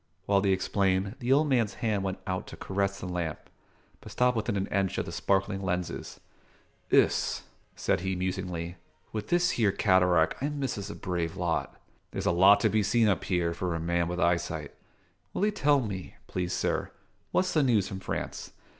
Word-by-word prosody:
While 100 -1 +3
they 100 - +1
explained, 95 +1 +1
the 125 0 -1
old 150 +3 +5
man's 120 -6 +1
hand 110 -5 0
went 95 -1 -2
out 95 -2 -3
to - - -9
caress 100 0 -1
the - - -6
lamp, 90 -3 -3 0.6
but 110 - -11
stopped 125 +3 +2
within 105 -2 -1
an 95 - 0
inch 95 -1 0
of - - -1
the - - -6
sparkling 95 0 0
lenses. 90 -1 -3 0.7
"Iss," - - +3 0.3
said - - +1
he 95 +1 -2
musingly, 90 -2 -3 0.3
"with 105 -1 -4
this 175 0 +3
here 105 -4 +2
cataract 90 -3 +3
I 140 - 0
misses 135 -9 -3
a - - -6
brave 85 -3 -3
lot. 85 -2 -2 0.3
There's - - -4
a - - +4
lot 95 +4 +6
to - - +4
be 110 - +2
seen 110 +2 +3
up 100 - +1
here, 85 -2 +1
for 85 0 -2
a - - -2
man 85 +1 0
with 90 0 -3
eyesight. 85 -4 0 0.6
Will 200 - +2
'ee 210 - +2
tell 145 -8 +3
me, 95 -6 -5
please 90 -1 -3
sir, - - -1 0.4
what's 185 - +1
the 155 - +4
news 115 -8 +3
from 95 - -6
France? 95 - -5
95 Hz, 190 wpm, -29 LUFS, 90-110 Hz, 0.7 s, lot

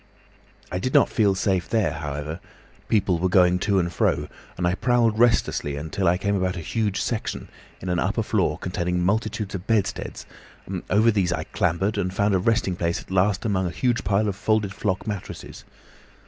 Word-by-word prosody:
"I 90 - -1
did 130 +7 -2
not - - +6
feel 100 -4 +2
safe 95 -2 0
there, 110 -4 +1
however; 75 +1 -5 0.5
people 100 -5 +2
were 95 +2 +1
going 90 -1 +4
to 100 +1 +1
and 85 -2 0
fro, - - +1 0.3
and 90 - -1
I 90 - +2
prowled 115 +1 +2
restlessly 110 -11 +2
about 70 - -5
until 95 +3 -1
I 90 +1 +4
came 100 +2 0
upon 95 -1 0
a 85 - -5
huge 105 +5 -1
section 115 -2 -3 0.3
in 95 - -8
an 90 -1 0
upper 105 +5 0
floor 95 -8 0
containing 90 -1 -2
multitudes 105 0 -1
of 95 0 -6
bedsteads, 110 -4 -1 0.4
and - - -4
over 110 +4 +4
these 95 -4 +1
I - - -1
clambered, 95 +5 0
and 90 -2 -1
found 100 +2 +1
a 95 - +3
resting 100 -2 +1
place 85 -1 -1
at - - -13
last 95 +2 +2
among 95 -4 +1
a - - -2
huge 120 +9 0
pile 100 +3 +1
of 100 - -1
folded 105 -1 0
flock 95 -3 -2
mattresses. 105 -4 -7
95 Hz, 195 wpm, -24 LUFS, 90-105 Hz, 0.5 s, not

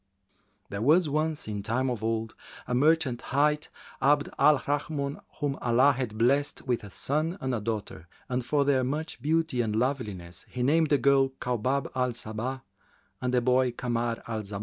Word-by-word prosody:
[FN#375] - - -42
There 100 0 -3
was 155 +6 +4
once, 155 0 -1
in 105 -1 -3
time 115 +6 0
of 115 -3 -4
old, 115 0 -1 0.3
a - - -2
merchant 140 -2 +2
hight 150 +3 +1 0.3
Abd 145 +1 +3
al 150 +1 +6
Rahmбn, 145 0 -2
whom 145 -2 -2
Allah 125 +4 +4
had 125 -5 -4
blessed 140 +5 +1
with 125 -4 -1
a 100 - -8
son 155 - -1
and 125 -5 -2
daughter, 105 -7 -4 0.2
and 125 0 -1
for 140 +3 +1
their 135 -2 +3
much 150 +1 -3
beauty 160 -3 +1
and 110 -2 -1
loveliness, 105 - -2
he 125 - -3
named 155 +4 +3
the 145 - +4
girl 135 +1 +4
Kaubab 125 +3 -1
al 125 -1 0
Sabбh 120 +4 -5 0.6
and 125 -1 0
the 125 -1 +3
boy 125 +1 +3
Kamar 120 -1 -2
al 110 -2 -2
Zamбn. 100 -1 -6
130 Hz, 175 wpm, -28 LUFS, 115-145 Hz, 0.6 s, al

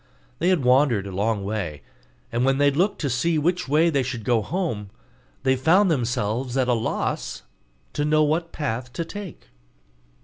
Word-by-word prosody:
They 175 - +2
had 175 -8 +2
wandered 125 -5 +3
a 100 - -6
long 100 +2 -1
way; 100 -8 -4 0.5
and 120 +2 0
when 135 +1 +3
they 145 0 +4
looked 180 +9 0
to 145 - 0
see 160 +7 +1
which 175 +3 0
way 155 +4 +3
they 140 -3 +2
should 125 -3 -4
go 120 0 +2
home, 110 - -3 0.5
they 130 0 +3
found 170 +8 +4
themselves 120 -1 -1
at 130 -2 +2
a 125 - +3
loss 115 -1 -2 0.5
to 145 - -1
know 155 +1 +3
what 165 +3 0
path 125 -4 -3
to 165 - -3
take. 190 - -9
135 Hz, 175 wpm, -24 LUFS, 115-160 Hz, 0.5 s, they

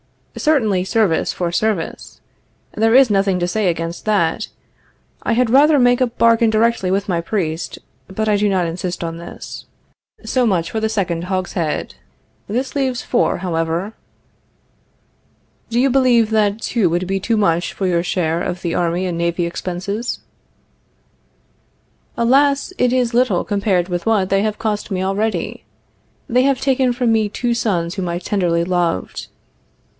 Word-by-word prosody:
Certainly, 220 -12 +1
service 195 -4 +1
for 175 -2 -2
service. 195 -1 -2 0.5
There 225 +2 +2
is 265 -4 +6
nothing 195 -2 +2
to 175 - 0
say 205 +2 0
against 165 0 -3
that. 195 -7 +1 0.7
I - - 0
had 240 -1 +2
rather 290 +3 +6
make 245 0 +3
a 255 - +4
bargain 230 -1 +3
directly 220 -3 +1
with 195 +2 0
my 175 -3 0
priest, 165 -3 -3 0.3
but 215 +3 -3
I 210 -1 +3
do 205 0 +2
not 185 -3 +1
insist 175 +1 -4
on 165 0 -4
this. 170 - -9 0.6
So 255 -2 +1
much 175 -5 0
for 220 - -1
the 220 0 0
second 180 -6 -2
hogshead. 180 -4 -2 0.5
This 255 +7 -3
leaves 260 -3 -1
four, 240 - +1
however. 170 +3 -2 1.8
Do 235 - 0
you 265 +1 +3
believe 240 -4 +3
that 215 0 +1
two 225 -7 +1
would 175 +2 -1
be 195 +1 -1
too 225 +4 0
much 175 -4 +1
for 195 - -3
your 175 -2 +2
share 170 -2 -1
of 180 0 -4
the 170 -2 -1
army 175 +1 0
and 175 -2 -3
navy 170 0 0
expenses? 185 +6 -4 2.0
Alas, 275 +7 +2
it 250 - +3
is 250 -2 +1
little 235 -7 +2
compared 195 -3 0
with 175 +3 -3
what 205 -4 +2
they 195 0 +2
have 215 0 -1
cost 215 -1 -2
me 190 -2 -2
already. 205 +3 -2 0.6
They 250 +2 +3
have 275 -1 +2
taken 265 -2 +2
from 245 -1 0
me 220 -2 +2
two 240 +3 -1
sons 180 -7 -1
whom 185 -3 -3
I 170 - -2
tenderly 175 -2 0
loved. 175 - -1
200 Hz, 160 wpm, -19 LUFS, 175-230 Hz, 2.0 s, is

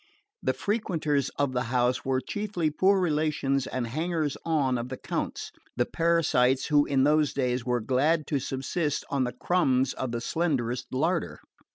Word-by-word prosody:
The - - 0
frequenters 165 - 0
of 140 -2 0
the 125 0 -1
house 125 +1 +1
were 130 -1 +1
chiefly 195 -6 -2
poor 190 +5 +3
relations 150 -5 0
and 130 -2 -2
hangers 155 +3 -1
on 140 -6 +1
of 120 +1 -5
the 130 - -5
Count's, - - -4 0.3
the 120 - +2
parasites 155 -6 +2
who 145 -1 +4
in 135 -2 +2
those 150 0 +3
days 125 -2 -1
were 125 -1 +1
glad 145 +7 +1
to 145 - -1
subsist 140 +4 -2
on 135 -2 +1
the 125 - -2
crumbs 135 -8 +1
of 130 -2 -4
the 120 - -2
slenderest 125 -4 -1
larder. 165 +7 -1
140 Hz, 165 wpm, -27 LUFS, 130-160 Hz, 0.3 s, who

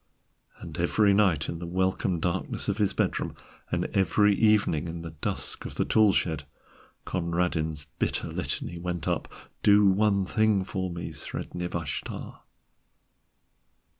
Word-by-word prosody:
And - - -8
every 105 -2 +3
night, 95 -7 +3
in 85 - -4
the 85 - -5
welcome 95 0 0
darkness 85 +1 -2
of 100 +2 -1
his 100 -2 +3
bedroom, - - -1 0.3
and - - 0
every 100 +2 +4
evening 100 -7 +3
in 85 0 -6
the 80 - -6
dusk 75 - -4
of - - -7
the - - +1
tool 110 -2 +5
shed, 80 -5 0 0.6
Conradin's 85 -3 -1
bitter - - -1
litany 85 - -3
went 85 -2 -3
up: - - -1 0.3
"Do 105 0 +6
one 100 0 +3
thing 110 -1 +2
for 95 -1 -3
me, 85 -1 -5
Sredni 90 +4 -5
Vashtar." 80 -5 -5
90 Hz, 135 wpm, -28 LUFS, 85-100 Hz, 0.6 s, Do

